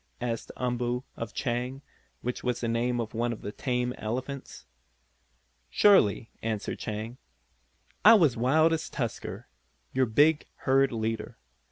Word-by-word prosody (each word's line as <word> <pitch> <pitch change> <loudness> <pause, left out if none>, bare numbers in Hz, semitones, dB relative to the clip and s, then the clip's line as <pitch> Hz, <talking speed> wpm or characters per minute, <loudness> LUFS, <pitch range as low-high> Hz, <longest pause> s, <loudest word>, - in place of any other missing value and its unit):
asked 115 -2 -3
Umboo 125 0 -1
of - - -5
Chang, 125 +2 -3 0.4
which 125 +1 -3
was 125 -1 -1
the 120 - -2
name 120 +1 0
of 110 -2 -4
one 120 +1 0
of 115 - -7
the 105 - -4
tame 125 +1 -1
elephants. 130 +5 -5 1.0
"Surely," 125 - +4
answered 110 -2 -3
Chang, 110 +3 -5 0.8
"I 225 +3 +10
was 165 - +5
as 120 - -10
wild 155 +7 +4
as 160 -1 -2
Tusker, 120 -5 -4 0.5
your 130 -1 +2
big 145 +7 +3
herd 135 0 +2
leader. 110 -1 -3
125 Hz, 140 wpm, -28 LUFS, 115-135 Hz, 1.0 s, I